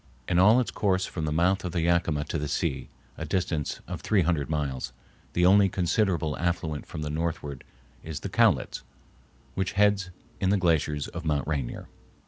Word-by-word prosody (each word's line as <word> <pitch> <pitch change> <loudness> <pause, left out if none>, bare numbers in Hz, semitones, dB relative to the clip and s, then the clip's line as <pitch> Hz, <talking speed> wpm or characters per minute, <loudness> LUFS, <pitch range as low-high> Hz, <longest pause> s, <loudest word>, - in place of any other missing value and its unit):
In 90 -1 +2
all 105 +6 +7
its 125 - -1
course 95 -3 +1
from 80 -3 -4
the 75 - -1
mouth 90 +5 +2
of 90 -2 -4
the 85 - 0
Yakima 85 -3 +1
to 80 - -3
the 75 - -2
sea, 65 -2 -2 0.3
a - - -3
distance 80 -5 -2
of - - -5
three 100 -4 +2
hundred 80 -4 0
miles, 70 -4 -2 0.4
the 90 - +3
only 100 +1 +6
considerable 85 -4 0
affluent 80 -3 -2
from 75 - -5
the 75 - -3
northward 75 -4 -3 0.4
is 80 -2 -6
the - - -3
Cowlitz, - - +2 0.7
which 95 -1 -2
heads 100 -2 +3 0.3
in 95 - +1
the 100 - +4
glaciers 80 -5 +1
of 85 - -7
Mount 75 -4 0
Rainier. 70 -6 -3
85 Hz, 180 wpm, -27 LUFS, 75-95 Hz, 0.7 s, all